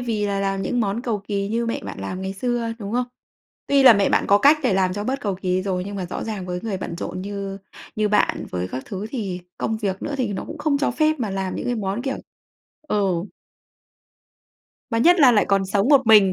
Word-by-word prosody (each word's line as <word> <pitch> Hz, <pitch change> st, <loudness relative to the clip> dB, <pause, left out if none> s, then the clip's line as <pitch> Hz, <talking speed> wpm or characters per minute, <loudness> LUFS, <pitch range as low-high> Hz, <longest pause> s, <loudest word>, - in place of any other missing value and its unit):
vì 220 Hz, -4 st, -1 dB
là 200 Hz, -1 st, -1 dB
làm 195 Hz, 0 st, -1 dB
những 245 Hz, -, 0 dB
món 215 Hz, +2 st, -1 dB
cầu 230 Hz, -4 st, -1 dB
kỳ 200 Hz, -1 st, -1 dB
như 230 Hz, +2 st, -1 dB
mẹ 230 Hz, -, -2 dB
bạn 100 Hz, -1 st, -7 dB
làm 180 Hz, -, -5 dB
ngày 190 Hz, 0 st, -3 dB
xưa, 235 Hz, +2 st, -2 dB
đúng 205 Hz, 0 st, -6 dB
không? 250 Hz, 0 st, 0 dB, 0.6 s
Tuy 280 Hz, -1 st, +4 dB
là 255 Hz, -3 st, +10 dB
mẹ 200 Hz, -2 st, +2 dB
bạn -, -, +2 dB
có 200 Hz, -, +6 dB
cách 285 Hz, +8 st, +6 dB
để 235 Hz, -7 st, +2 dB
làm 185 Hz, -1 st, +2 dB
cho 205 Hz, +1 st, -3 dB
bớt 270 Hz, +4 st, -2 dB
cầu 200 Hz, -3 st, -1 dB
kỳ 185 Hz, -1 st, -1 dB
rồi, 185 Hz, -2 st, -2 dB
nhưng 200 Hz, 0 st, -6 dB
mà 185 Hz, -, -3 dB
rõ 175 Hz, -, -5 dB
ràng 210 Hz, -5 st, -4 dB
với 180 Hz, 0 st, -3 dB
người 205 Hz, -4 st, -2 dB
bận 170 Hz, -, -5 dB
rộn 185 Hz, -, -5 dB
như 200 Hz, -1 st, -5 dB, 0.4 s
như 215 Hz, -1 st, +1 dB
bạn 210 Hz, -, +1 dB
với 90 Hz, 0 st, -3 dB
các 130 Hz, +6 st, -5 dB
thứ 195 Hz, +1 st, -5 dB
thì 195 Hz, -8 st, -4 dB, 0.2 s
công 220 Hz, -, -1 dB
việc 195 Hz, -3 st, -3 dB
nữa 290 Hz, -, -4 dB
thì 235 Hz, -6 st, -1 dB
nó 190 Hz, -, -4 dB
cũng 315 Hz, -, -8 dB
không 295 Hz, -1 st, +1 dB
cho 285 Hz, -, +1 dB
phép 310 Hz, +2 st, +1 dB
mà 225 Hz, -4 st, -1 dB
làm 190 Hz, -1 st, -3 dB
những -, -, -4 dB
cái 245 Hz, -, 0 dB
món 200 Hz, +1 st, -2 dB
kiểu 270 Hz, 0 st, -2 dB, 0.7 s
ừ. 195 Hz, -, 0 dB, 1.7 s
Mà 230 Hz, -, +1 dB
nhất 345 Hz, +7 st, +5 dB
là 255 Hz, -3 st, +8 dB
lại 210 Hz, -, +4 dB
còn 195 Hz, -1 st, +2 dB
sống 200 Hz, +5 st, +1 dB
một 270 Hz, -5 st, +5 dB
mình. 205 Hz, -4 st, +7 dB
205 Hz, 245 wpm, -22 LUFS, 190-240 Hz, 1.7 s, là